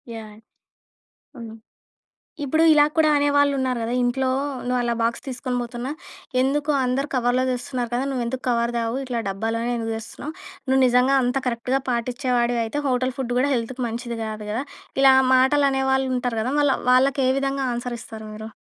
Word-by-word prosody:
Yeah! 215 -2 -9 1.0
హ్మ్. 225 -2 -8 0.9
ఇప్పుడూ 315 +4 +2
ఇలా 295 -1 +6
కూడా 315 -1 +4
అనేవాళ్ళున్నారు 285 -3 +2
గదా! 230 +2 -2
ఇంట్లో 260 +2 0 0.4
నువ్వలా 245 -1 0
బాక్స్ 230 +4 -1
తీసుకొని 250 -1 -3
బోతున్నా, 240 +2 -5 0.5
"ఎందుకు, 290 +3 0
అందరూ 260 +3 0
కవర్‌లో 250 0 +2
దెస్తున్నారు 250 -1 -3
కదా! 250 +2 0
నువ్వెందుకు 255 0 -3
కవర్ 235 -1 +1
దేవు? 230 0 -1
ఇట్లా 250 -2 -3
డబ్బాలోనే 225 +4 -2
ఎందుకు 225 0 -3
తెస్తున్నావు? 230 +7 -7 0.4
నువ్వు 265 0 +3
నిజంగా 250 +2 +3
అంత 250 +2 -1
కరెక్ట్‌గా 250 +3 -1
పాటిచ్చే 245 +2 -2
వాడివయితే, 235 +3 0
హోటల్ 255 0 0
ఫుడ్ 245 -2 -2
గూడా 280 +3 +2
హెల్త్‌కు 250 +2 -3
మంచిది 235 0 -5
గాదు 215 -1 -6
గదా!" 235 +6 -2 0.4
ఇలా 270 -1 +8 0.2
మాటలనేవాళ్ళుంటరు 265 -3 +2
గదా! 250 +4 -2
మళ్ళ 290 -2 +3 0.2
వాళ్ళకేవిధంగా 270 +1 +2
ఆన్సరిస్తారు 235 -2 -6
మీరు. 215 +1 -7
250 Hz, 140 wpm, -23 LUFS, 235-265 Hz, 1.0 s, ఇలా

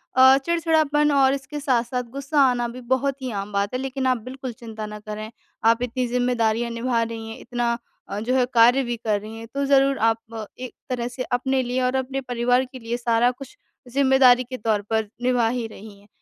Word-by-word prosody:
अ, 260 +1 +8
चिड़चिड़ापन 310 -2 +2
और 270 -1 +4
इसके 280 +2 -5
साथ-साथ 250 -2 0
गुस्सा 280 +2 -1
आना 240 -1 0
भी 250 +2 -8
बहुत 275 +1 -1
ही 255 -2 -3
आम 200 0 -4
बात 200 +3 0
है, 255 - -1
लेकिन 265 0 -3
आप 255 -1 +3
बिल्कुल 255 0 -6
चिंता 220 -2 -8
ना 210 0 -8
करें, 215 +1 -7 0.3
आप 230 +1 +4
इतनी 250 +1 -1
ज़िम्मेदारियाँ 240 -2 0
निभा 235 0 0
रही 225 -1 -6
हैं, 225 - -8
इतना 240 -1 -1 0.3
अ, 200 - -3
जो 250 +4 -1
है 250 -1 +3
कार्य 240 +3 +6
भी 240 -1 -3
कर 215 -2 0
रही 220 +1 -9
हैं 225 0 -9
तो 280 0 -1
ज़रूर 275 0 +4
आप 225 -1 -5
एक 255 -1 -6 0.2
तरह 245 -2 -2
से 250 +1 -5
अपने 265 +1 0
लिए 250 +1 -1
और 255 +1 +1
अपने 265 +1 -2
परिवार 245 +1 +1
के 260 - -9
लिए 235 +1 -3
सारा 235 0 +2
कुछ 265 +1 -12 0.4
ज़िम्मेदारी 265 -2 +5
के 255 +1 -7
तौर 215 -2 0
पर 220 -1 0 0.2
निभा 245 -2 +2
ही 240 0 -2
रही 210 -1 -12
हैं। 205 - -22
245 Hz, 210 wpm, -23 LUFS, 230-265 Hz, 0.4 s, अ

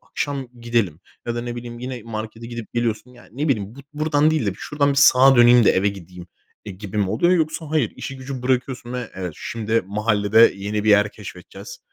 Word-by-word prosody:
akşam 140 -3 -4
gidelim 115 -9 -1 0.3
ya 120 - -2
da 120 - -2
ne 120 0 -5
bileyim 120 0 -8
yine 125 -2 -6
markete 110 0 -7
gidip 120 -2 -8
geliyorsun. 120 0 -2
Ya 120 -1 -17
ne 145 +6 -2
bileyim 105 -3 -1
bu - - -16
buradan 150 0 +2
değil 155 -9 0
de - - +2
bir - - -8
şuradan 145 -1 0
bir - - 0
sağa 135 -1 +6
döneyim 120 -1 +7
de - - +6
eve 95 +2 +2
gideyim 90 -2 -9 0.4
e, 105 - -7
gibi 100 +2 -8
mi 100 -2 +1
oluyor? 170 - +2
Yoksa 160 -1 0
hayır 155 -1 +1
işi 135 - -6
gücü 130 -1 -7
bırakıyorsun 125 -1 -2
ve 125 -2 -5
evet 90 -3 -5
şimdi 115 0 -1
mahallede 105 +1 +3
yeni 105 +2 -3
bir 110 - +3
yer 105 0 +4
keşfedeceğiz. - - -11
120 Hz, 210 wpm, -21 LUFS, 105-130 Hz, 0.4 s, döneyim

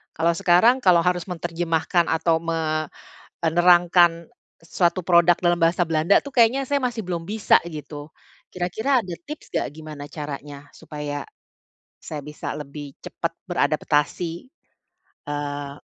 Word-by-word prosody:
Kalau 165 +2 +2
sekarang 225 +11 +4
kalau 180 -3 +6
harus 180 -1 +1
menterjemahkan 170 0 -1
atau 160 0 +2
me 160 -2 -2 0.5
eee, 165 - +2
nerangkan 175 -1 +4 0.3
suatu 170 +2 0
produk 175 0 +5
dalam 175 -1 +2
bahasa 170 +2 +3
Belanda 160 +4 +3
tuh 280 - -8
kayaknya 245 +3 +4
saya 285 0 +2
masih 240 -2 -2
belum 170 -2 -3
bisa 210 +4 +3
gitu. 150 -2 -8 0.4
Kira-kira 220 +9 0
ada 180 -4 -6
tips 300 +1 -8
nggak - - 0
gimana 155 -2 -9
caranya 145 -1 -8
supaya 145 -2 -6 0.7
saya 150 -2 -7
bisa 150 +1 -6
lebih 145 -1 -8
cepat - - -4 0.2
beradaptasi? 150 +3 0 0.9
Eee 145 -1 -5
165 Hz, 130 wpm, -23 LUFS, 150-180 Hz, 0.9 s, kalau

